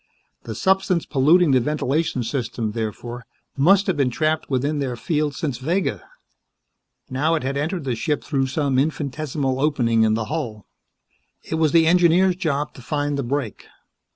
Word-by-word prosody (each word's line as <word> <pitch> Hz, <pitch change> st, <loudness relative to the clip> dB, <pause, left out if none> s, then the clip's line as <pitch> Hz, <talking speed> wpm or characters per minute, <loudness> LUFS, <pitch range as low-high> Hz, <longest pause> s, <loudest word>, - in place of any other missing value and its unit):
The 110 Hz, -, -5 dB
substance 190 Hz, -, +1 dB
polluting 155 Hz, +4 st, +4 dB
the 130 Hz, -, +5 dB
ventilation 150 Hz, 0 st, -1 dB
system, 115 Hz, -3 st, -3 dB
therefore, 115 Hz, +2 st, -5 dB, 0.3 s
must 185 Hz, +8 st, +4 dB
have 190 Hz, -, 0 dB
been 140 Hz, -3 st, +1 dB
trapped 155 Hz, +5 st, -1 dB
within 145 Hz, +3 st, 0 dB
their 130 Hz, -3 st, -2 dB
field 150 Hz, +2 st, -1 dB
since 140 Hz, -7 st, -3 dB
Vega. 170 Hz, +8 st, -1 dB, 1.1 s
Now 150 Hz, +6 st, +1 dB
it 155 Hz, -, -2 dB
had 135 Hz, +1 st, -2 dB
entered 160 Hz, +4 st, -2 dB
the 130 Hz, -2 st, -1 dB
ship 150 Hz, +6 st, -2 dB
through 135 Hz, -3 st, 0 dB
some 135 Hz, -1 st, 0 dB
infinitesimal 140 Hz, -2 st, -2 dB
opening 120 Hz, -7 st, +2 dB
in 110 Hz, -1 st, +3 dB
the 110 Hz, -1 st, -2 dB
hull. 115 Hz, -7 st, -4 dB, 0.8 s
It -, -, -7 dB
was 155 Hz, -2 st, +3 dB
the 165 Hz, 0 st, +5 dB
engineer's 175 Hz, +2 st, +4 dB
job 155 Hz, -5 st, -2 dB
to -, -, -12 dB
find 145 Hz, +3 st, -2 dB
that 140 Hz, -, -2 dB
break. 135 Hz, -5 st, -3 dB
145 Hz, 160 wpm, -22 LUFS, 130-160 Hz, 1.1 s, the